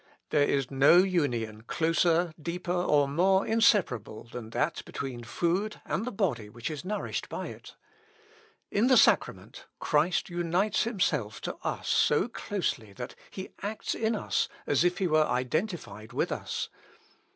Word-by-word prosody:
"There 150 - +3
is 135 -2 0
no 140 +5 +6
union 130 - +1
closer, 165 +5 +1
deeper, 175 +2 -4
or 150 -5 +3
more 190 +7 +3
inseparable 185 - +2
than 115 -1 -8
that - - -1
between 125 -3 -6
food 175 - -1
and 210 - -2
the 250 - -3
body 155 - -1
which 120 +7 -5
is 150 +1 -6
nourished 210 +3 -3
by - - -4
it. - - -12 1.0
In 215 +5 +3
the 255 -1 +6
sacrament, - - +2
Christ 160 +4 +1
unites 175 +5 0
himself 150 - -1
to - - -4
us - - -4
so 150 +8 +3
closely 180 - -3
that 125 +3 -7 0.2
he 190 0 -7
acts 210 +2 -3
in 225 0 0
us - - 0 0.2
as 145 - +2
if 175 0 +2
he 190 - 0
were 155 -2 +3
identified 130 - -2
with - - 0
us. - - -3
170 Hz, 150 wpm, -29 LUFS, 130-190 Hz, 1.0 s, no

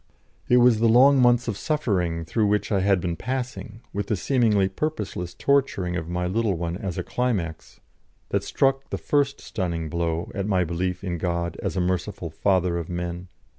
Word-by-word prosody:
It 125 - +6
was 120 -2 +5
the 115 0 +4
long 130 +4 +6
months 120 -1 +4
of 110 - -1
suffering 95 - -1
through 105 +6 +1
which 105 +1 0
I 100 - +3
had 95 0 +3
been 85 -1 -2
passing, 125 -1 -5
with 100 0 -2
the 105 - +1
seemingly 105 -3 +2
purposeless 95 - -4
torturing 135 -11 +1
of 85 -1 -4
my 90 0 -1
little 100 +2 0
one 85 0 -3
as 95 -2 -5
a - - -2
climax, 100 -11 -3 0.5
that - - 0
struck 135 0 +1
the - - -2
first 140 -1 0
stunning 85 -6 -3
blow 85 0 -2
at 100 0 -2
my 95 -3 +2
belief 90 +2 -2
in 90 -3 -3
God 85 0 -2
as - - -3
a - - +2
merciful 90 -1 -2
Father 90 0 +1
of 85 - -6
men. 85 0 -4
95 Hz, 185 wpm, -24 LUFS, 85-120 Hz, 0.5 s, It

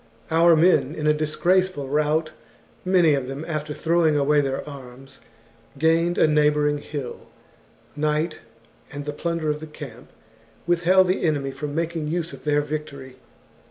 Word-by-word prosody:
Our 165 +1 +5
men, 160 -3 +3
in 150 - -4
a 150 - +4
disgraceful 155 +1 0
rout, 155 +2 0 0.5
many 180 -4 +4
of 135 -3 -1
them 135 +4 -6
after 155 -2 -4
throwing 160 0 +1
away 145 +1 +3
their 135 0 -3
arms, 135 -1 -11 0.6
gained 165 +3 +2
a - - +5
neigh 150 -1 +4
bouring 150 0 0
hill. 145 -4 -7 0.7
Night, 155 +2 -1 0.5
and 145 0 -6
the 150 - -4
plunder 165 0 -2
of 150 - -4
the 155 - -8
camp, 135 -6 -11 0.6
withheld 175 +2 +4
the 185 - 0
enemy 145 -4 0
from 145 +1 -6
making 165 -1 -2
use 170 +1 -2
of - - -12
their 150 0 +2
victory. 140 -3 -7
150 Hz, 155 wpm, -23 LUFS, 145-165 Hz, 0.7 s, Our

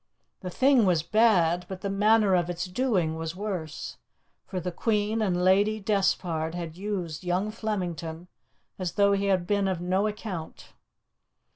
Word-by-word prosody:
The 185 - -6
thing 255 +1 +4
was 170 -4 +2
bad, 180 -4 +3
but 190 -1 -6
the 200 - -2
manner 210 0 +4
of 175 -1 +2
its 175 +1 -3
doing 180 -6 0
was 165 +1 -4
worse, 185 -6 -5 0.5
for 185 - -3
the 180 +1 -4
Queen 215 +3 0
and 180 -4 0
Lady 205 +4 +3
Despard 180 -5 0
had 170 -2 -5
used 185 -4 -4
young 180 +4 -1
Flemington 175 -6 -4 0.5
as 180 -2 -3
though 200 -1 +4
he 200 0 0
had 190 -3 +1
been 200 +1 +1
of 185 -3 -1
no 185 +4 +1
account. 205 -6 -7
185 Hz, 155 wpm, -27 LUFS, 175-210 Hz, 0.5 s, thing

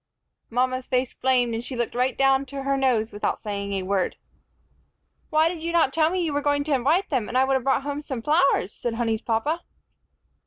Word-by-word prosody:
Mama's 255 +2 0
face 255 -1 0
flamed, 250 -2 +1
and 225 +1 -3
she 255 - -6
looked 240 -1 -2
right 250 +1 0
down 270 0 +3
to 275 +1 -6
her 275 0 +1
nose 245 -5 +1
without 205 0 -2
saying 200 -1 -4
a 190 -1 -2
word. 190 -1 0 1.1
"Why 310 +1 +4
did 335 -1 -4
you 335 +1 -2
not 330 -5 +3
tell 315 -1 +3
me 365 0 -1
you 315 -3 -1
were 290 - 0
going 285 0 +1
to 295 0 -1
invite 290 +9 +2
them, 250 -6 0
and 250 - -1
I 260 - +5
would 270 0 +1
have 265 -2 +1
brought 270 +1 +1
home 285 +1 -3
some 260 -6 -5
flowers?" 275 - +2
said 235 -2 -3
Honey's 225 -1 -1
papa. 245 +10 -1
265 Hz, 220 wpm, -24 LUFS, 235-290 Hz, 1.1 s, I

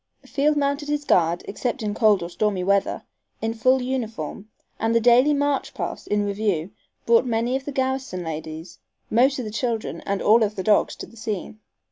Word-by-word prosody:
Field 295 +1 +1
mounted 285 +1 0
his 295 0 -1
guard, 170 -5 +2
except 240 +4 -3
in 210 -1 -1
cold 210 -4 +3
or 170 - -5
stormy 195 0 0
weather, 200 +1 +1 0.4
in 225 0 -2
full 255 +3 +2
uniform, 220 - -4 0.3
and 225 +1 +1
the - - +6
daily 245 +5 +5
"march 285 -1 0
past" - - -5
in 205 0 +1
review 200 -4 -1 0.3
brought 230 +1 +5
many 240 0 0
of 270 0 -3
the 290 - -4
garrison 265 -8 -2
ladies, 160 +1 -7 0.3
most 260 +5 +4
of 255 - -4
the 215 - -5
children 230 -1 -2
and 200 0 0
all 225 +3 +5
of 210 -1 +1
the 190 - -3
dogs 210 +2 +3
to - - -7
the - - -18
scene. 215 -1 -5
225 Hz, 190 wpm, -23 LUFS, 200-260 Hz, 0.4 s, the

